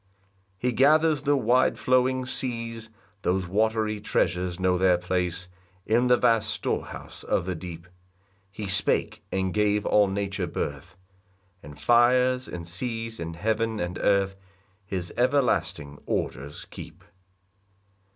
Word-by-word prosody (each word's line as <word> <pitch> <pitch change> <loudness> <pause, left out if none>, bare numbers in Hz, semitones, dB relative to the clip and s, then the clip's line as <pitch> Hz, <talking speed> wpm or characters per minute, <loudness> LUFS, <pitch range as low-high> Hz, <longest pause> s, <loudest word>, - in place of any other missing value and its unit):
3 125 - +1
He - - +1
gathers 150 +4 +4
the 145 0 +2
wide 125 +1 +2
flowing 130 0 +2
seas, 115 -3 -2 0.3
Those 95 0 0
watery 110 +3 0
treasures 90 -2 0
know 90 -1 +2
their 90 -1 +4
place, 90 0 -2 0.4
In 120 +3 +2
the 125 0 +5
vast 115 -3 +2
storehouse - - -4
of - - 0
the 95 - -2
deep: 85 0 -8 0.6
He 105 +2 -6
spake, 100 +2 +1
and 95 -1 -1
gave 105 0 +1
all 105 -1 +4
nature 100 -1 -2
birth; 75 +4 -5 0.6
And 75 -1 -12
fires, 125 +5 +3
and 85 -1 -7
seas, 115 +4 -4
and 85 0 -5
heaven, 110 +3 -1
and 90 -1 -3
earth, 100 -1 +2 0.5
His 90 -3 -4
everlasting 120 - 0
orders 70 +3 -3
keep. - - -10
105 Hz, 130 wpm, -26 LUFS, 90-120 Hz, 0.6 s, the